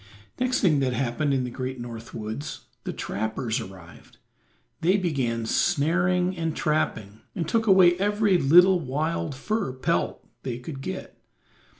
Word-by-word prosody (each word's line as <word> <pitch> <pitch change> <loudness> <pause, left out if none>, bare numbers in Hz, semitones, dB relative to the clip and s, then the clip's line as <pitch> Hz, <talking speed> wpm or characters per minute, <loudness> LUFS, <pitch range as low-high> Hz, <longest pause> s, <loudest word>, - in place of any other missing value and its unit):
Next 255 0 +1
thing 155 -8 +4
that 130 -2 0
happened 135 +4 0
in 135 -2 +1
the 125 - -4
great 130 +1 -5
North 115 -1 -8
woods, 110 +7 -6 0.2
the - - -2
trappers 110 +2 -3
arrived; 95 -4 -13 0.6
they 185 +5 +3
began 130 - -1
snaring 180 +9 +1
and 165 -2 -2
trapping, 110 -9 -1
and 170 -5 -2
took 225 -1 +1
away 185 -3 +6
every 205 -1 +2
little 180 +6 +6
wild 155 +1 -2
fur 205 - -2
pelt 130 - -1 0.2
they 125 -3 -4
could 135 +2 -8
get. - - -6
145 Hz, 140 wpm, -26 LUFS, 120-180 Hz, 0.6 s, away